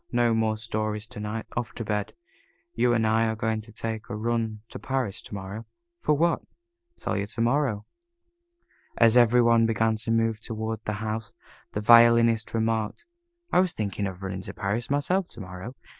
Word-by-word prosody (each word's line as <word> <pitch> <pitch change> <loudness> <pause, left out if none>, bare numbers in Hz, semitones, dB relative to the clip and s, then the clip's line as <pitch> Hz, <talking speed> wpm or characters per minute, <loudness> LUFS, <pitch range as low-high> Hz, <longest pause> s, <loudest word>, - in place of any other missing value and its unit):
No 120 -1 +3
more 110 -1 +1
stories 110 -1 -2
to - - -7
night. 105 +1 -4
Off 120 -1 -3
to 115 - -5
bed. 105 -1 -2 0.6
You 125 - +2
and 115 -1 +2
I 110 +1 +3
are 110 - -1
going 110 0 -1
to 110 +1 -14
take 110 +1 -5
a 110 - -3
run 110 -1 -1
to - - -8
Paris 130 -7 -2
to - - -8
morrow." 100 +3 -7 0.4
"What 150 - +4
for?" 170 +2 +2 0.6
"Tell - - -2
you 100 0 -2
to 115 +2 -4
morrow." 120 -4 +1 1.1
As 115 0 +5
every 120 0 +6
one 115 -1 +4
began 115 0 +1
to 110 +1 -5
move 115 -1 +1
toward 110 -1 -4
the 105 - -1
house, 110 0 -4 0.4
the 105 - -2
Violinist 115 0 +6
remarked, 110 - -1 0.5
"I - - +4
was 185 -2 +2
thinking 100 -1 -2
of 95 0 -8
running 95 -1 -4
up 95 - -7
to - - -6
Paris 105 +5 -2
myself 165 +7 +1
to 115 - -8
morrow. 90 +7 -8
110 Hz, 190 wpm, -26 LUFS, 105-115 Hz, 1.1 s, every